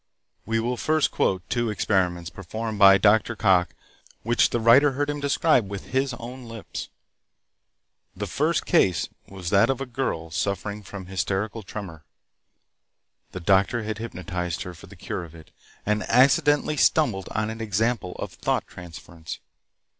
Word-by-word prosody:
We 115 0 +1
will 120 +2 -1
first 155 +3 +1
quote 90 -3 0
two 120 +3 0
experiments 90 -5 0
performed 110 +4 -5
by 100 -1 +8
Dr. 110 +3 +3
Cocke 95 -5 +2 0.5
which 120 +1 +3
the 120 - -1
writer 130 +5 +6
heard 145 +2 -1
him 145 - -5
describe 140 -5 +2
with 100 -1 -7
his 130 -1 0
own 125 +2 -9
lips. 115 -2 -7 1.3
The - - -4
first - - 0
case 90 -5 +2 0.2
was 95 -2 -6
that 100 +4 +5
of 135 - 0
a 135 - -3
girl 115 -10 -3
suffering 100 +4 -2
from 100 -2 -9
hysterical 95 +4 -2
tremor. 95 -6 -8 1.3
The 95 - -7
doctor 100 +6 +2
had 110 0 -4
hypnotized 90 -5 -4
her 90 -2 -7
for 85 - -14
the - - -14
cure 90 - -5
of 85 -1 -12
it, 80 -1 -15 0.3
and 105 +1 +1
accidentally 145 +4 +4
stumbled 120 -12 +2
on 110 0 -2
an 110 0 -7
example 110 -2 -1
of - - -7
thought - - -1
transference. 85 -1 -10
105 Hz, 155 wpm, -25 LUFS, 90-120 Hz, 1.3 s, by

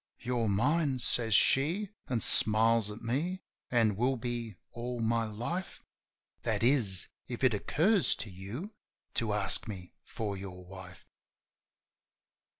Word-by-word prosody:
"You're 120 -2 -1
mine," 140 +7 +2
says 115 -2 +1
she, 170 - +3 0.2
an' 120 -3 -1
smiles 110 0 +4
at 105 +2 -9
me, 160 +11 -2 0.3
"an' 115 -4 +3
will 125 +5 +1
be 120 -3 -4 0.2
all 120 +1 -5
my 115 0 +1
life 120 - -5 0.3
— - - -52
That - - -1
is, 115 -8 +4 0.2
if 120 +1 -6
it 130 -3 +5
occurs 170 - +2
to 105 - -7
you 110 - -7 0.4
to 115 -2 -1
ask 105 +2 +1
me 95 -4 -8
for 105 -3 -4
your 90 -2 -8
wife." 90 -1 -11
115 Hz, 135 wpm, -31 LUFS, 105-130 Hz, 0.4 s, it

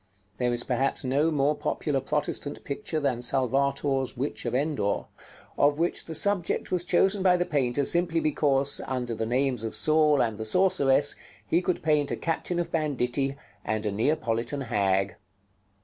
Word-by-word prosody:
There 125 -1 +1
is 120 0 -1
perhaps 130 +2 -1
no 140 +5 +2
more 145 -1 +2
popular 145 -2 -2
Protestant 145 0 -2
picture 155 +2 -3
than 135 -5 -1
Salvator's 135 +1 0
"Witch 135 +1 -3
of 120 - -1
Endor," 135 -7 -1 0.5
of 145 0 +4
which 170 +2 0
the 160 - -5
subject 195 0 0
was 180 -1 +1
chosen 190 +3 +2
by 180 -1 +4
the 175 - 0
painter 140 -4 0
simply 170 +2 +2
because, 140 -3 +1
under 125 -2 -2
the 110 0 -3
names 125 -1 0
of 110 - -4
Saul 150 +5 +3
and 110 -4 0
the 110 - -4
Sorceress, 145 - +3 0.3
he 170 - +1
could 180 -1 -2
paint 150 -2 +2
a - - -2
captain 170 +1 -2
of 170 -1 -3
banditti, 135 -3 -1 0.3
and 110 0 -2
a 105 - 0
Neapolitan 115 +3 -1
hag. 100 -5 0
140 Hz, 165 wpm, -27 LUFS, 125-155 Hz, 0.5 s, of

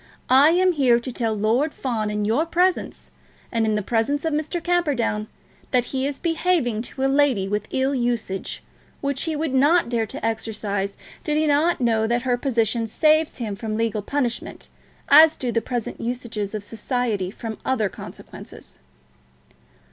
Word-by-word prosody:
"I 275 +4 +7
am 365 +2 +4
here 260 -7 +3
to 255 +2 -6
tell 225 -2 -1
Lord 230 +9 +1
Fawn 225 -5 -2
in 210 0 -1
your 230 +9 +2
presence, 360 +2 0 0.4
and 225 -2 +1
in 215 - +1
the 210 - -1
presence 245 +8 0
of 320 - 0
Mr. 310 +3 -2
Camperdown, 290 -12 0 0.4
that 250 -2 +2
he 265 +1 0
is 285 -1 -4
behaving 330 -9 0
to 265 +3 -5
a - - +3
lady 270 -8 +2
with 210 +1 -2
ill 265 +1 0
usage, 240 -6 -2 0.4
which 280 0 -1
he 320 -2 -2
would 300 -2 -2
not 290 +3 +4
dare 230 -2 0
to 210 - -6
exercise 210 -3 -2 0.3
did 300 -1 0
he 310 - +2
not 305 +4 +2
know 225 -3 +2
that 240 +1 0
her 250 -2 +1
position 235 -3 0
saves 310 +6 +2
him 220 -5 -4
from 215 +1 -4
legal 225 -2 -1
punishment, 245 +1 -3 0.4
as 310 +2 +7
do 250 -2 -2
the 230 0 +1
present 240 -2 -4
usages 230 -4 -4
of 210 - -4
society 225 -3 -2
from 220 +2 -7
other 240 -5 +1
consequences." 190 - -11
245 Hz, 170 wpm, -23 LUFS, 220-290 Hz, 0.4 s, I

